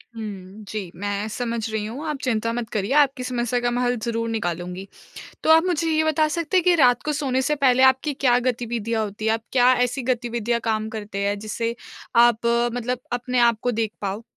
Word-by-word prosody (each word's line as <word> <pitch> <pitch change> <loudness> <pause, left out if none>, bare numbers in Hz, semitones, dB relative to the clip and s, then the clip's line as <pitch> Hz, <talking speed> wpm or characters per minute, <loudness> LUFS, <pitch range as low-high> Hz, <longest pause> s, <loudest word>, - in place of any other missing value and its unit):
हुँ, 205 -2 -8
जी। 200 -5 -5
मैं 205 +2 -3
समझ 235 +1 -3
रही 215 -1 -2
हूँ, 250 +8 -6
आप 300 -2 -2
चिंता 230 -3 0
मत 235 -2 -4
करिए, 205 +2 -2
आपकी 280 -3 +3
समस्या 245 -1 -1
का 240 0 0
मैं 245 +1 -1
हल 245 0 +1
ज़रूर 230 -1 -2
निकालूँगी। 180 -3 -4 0.6
तो - - +2
आप 325 +1 +7
मुझे 335 -2 0
ये 315 0 +2
बता 315 0 +2
सकते 335 +3 -1
हैं 360 - +3
कि 360 - +5
रात 250 -6 +4
को 305 - -1
सोने 270 -3 0
से 300 +3 +1
पहले 260 -2 +3
आपकी 265 +3 +3
क्या 250 -2 +3
गतिविधियाँ 230 -2 -2
होती 210 +1 -6
है? 220 - +3
आप 225 0 -2
क्या 250 -1 +5
ऐसी 250 +2 -3
गतिविधि 240 -2 -1
या 235 - +2
काम 220 -1 0
करते 210 -2 -6
हैं 205 0 -1
जिससे 230 +2 -3 0.5
आप 235 -1 +2 0.3
मतलब 245 +1 -2
अपने 245 +1 -1
आपको 235 0 +3
देख 225 -1 -1
पाओ? 200 +2 -3
240 Hz, 210 wpm, -23 LUFS, 215-260 Hz, 0.6 s, आप